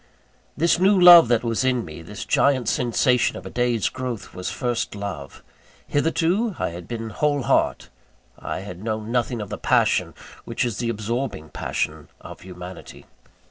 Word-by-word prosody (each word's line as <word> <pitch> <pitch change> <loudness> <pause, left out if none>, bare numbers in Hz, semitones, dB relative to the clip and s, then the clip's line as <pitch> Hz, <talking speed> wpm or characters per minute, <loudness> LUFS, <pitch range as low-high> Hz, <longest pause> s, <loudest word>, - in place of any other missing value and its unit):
This 170 +3 +2
new 190 +1 +4
love 175 -4 +10
that 120 -1 +2
was 115 +1 0
in 125 -4 +1
me; 80 0 -9
this 100 +5 -8
giant 130 -5 +2
sensation 125 +1 +1
of 90 - -10
a 95 - -7
day's 120 -3 0
growth, 130 -4 -5
was 90 0 -4
first 120 -5 -2
love. 90 -9 -7 0.4
Hitherto, 170 +8 0
I - - -1
had 85 +1 -9
been 115 -1 -5
heart 145 +3 0
whole. - - +2 0.8
I - - -3
had 95 -1 -9
known 110 0 -3
nothing 120 -1 -1
of 105 - -6
the 105 - -6
passion, - - +1 0.3
which - - -2
is 120 -4 -3
the 120 - -2
absorbing 110 - -3
passion - - -3
of - - -11
humanity. 90 0 -10
115 Hz, 165 wpm, -23 LUFS, 100-130 Hz, 0.8 s, love